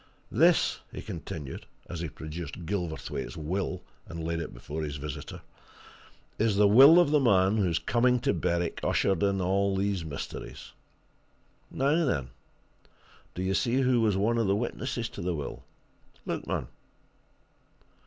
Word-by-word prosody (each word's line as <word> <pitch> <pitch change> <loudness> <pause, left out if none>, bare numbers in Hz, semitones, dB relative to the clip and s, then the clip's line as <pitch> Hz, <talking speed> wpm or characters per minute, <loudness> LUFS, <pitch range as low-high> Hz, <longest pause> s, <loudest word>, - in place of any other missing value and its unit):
This," - - +3
he - - -7
continued, 70 -4 -7 0.2
as 85 +1 -6
he 85 -1 -3
produced 80 +1 -7
Gilverthwaite's 85 -3 -4
will, 90 +5 -3 0.2
and 85 -1 -6
laid 85 +1 -2
it - - -5
before 70 +6 -6
his 75 -2 -4
visitor, 75 -1 -7 1.0
"is 110 -2 +2
the 105 +1 +5
will 135 +10 +9
of 175 -5 +3
the 150 - +5
man 100 -5 +3
whose 90 -6 +1
coming 125 +1 +2
to - - +1
Berwick 85 -1 -1
ushered 95 -4 +1
in 100 -1 +2
all 95 +2 +1
these 95 -2 0
mysteries. 75 -3 -7 1.0
Now, 145 +5 +1
then 70 - -1 1.0
do 90 - -3
you 95 +1 0
see 120 +6 +1
who 125 -2 +3
was 105 -4 +2
one 115 +4 +1
of 115 - +1
the 100 - +3
witnesses 120 +1 -3
to - - -8
the 90 0 -1
will? 75 -3 -6 0.6
Look, - - -4
man!" - - -2
95 Hz, 150 wpm, -28 LUFS, 80-115 Hz, 1.0 s, will